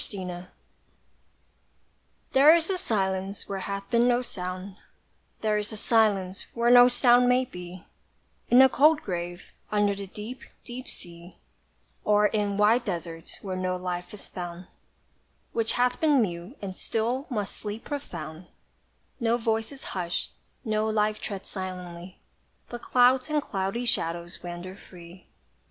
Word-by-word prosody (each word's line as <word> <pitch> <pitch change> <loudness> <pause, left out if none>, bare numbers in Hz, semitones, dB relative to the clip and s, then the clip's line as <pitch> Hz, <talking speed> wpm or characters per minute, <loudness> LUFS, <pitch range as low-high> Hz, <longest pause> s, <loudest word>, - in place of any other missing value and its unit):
SILENCE. 180 -3 -5 1.9
There 290 +5 +8
is 335 +2 0
a 375 - 0
silence 195 - -1
where 195 -1 -3
hath 200 +1 -4
been 235 0 +4
no 245 0 +3
sound, 185 -2 -6 0.6
There 215 -1 +2
is 210 - -4
a 215 - -6
silence 205 -4 +2
where 235 0 +3
no 245 0 +9
sound 245 0 +5
may 250 +1 +4
be, 180 -4 -10 0.6
In 245 - +6
the 265 +1 +10
cold 305 +4 +4
grave 175 -1 -4 0.3
under 205 -1 +3
the 200 0 -6
deep 215 +6 -8 0.2
deep 250 +2 -8
sea, 170 +1 -10 0.7
Or 210 0 +4
in 205 -1 +1
wide 220 +4 +4
desert 170 -4 -5
where 190 -2 -3
no 185 0 -1
life 180 -1 -4
is 210 - -9
found, 175 0 -7 0.9
Which 230 -1 +1
hath 250 0 +1
been 300 -4 +5
mute, 180 - -2
and 190 -2 -4
still 240 +8 -1
must 210 -6 -3
sleep 210 +1 -6
profound; 170 - -6 0.7
No 235 -1 +2
voice 225 0 -1
is 275 -1 -9
hush'd 175 -2 -2 0.3
no 215 0 +1
life 215 0 +1
treads 195 -2 -6
silently, 180 -2 -6 0.5
But 240 0 -6
clouds 255 +2 +4
and 305 0 +2
cloudy 200 -1 -2
shadows 170 -5 -1
wander 175 +1 -7
free. 180 -2 -14
205 Hz, 140 wpm, -27 LUFS, 185-240 Hz, 1.9 s, the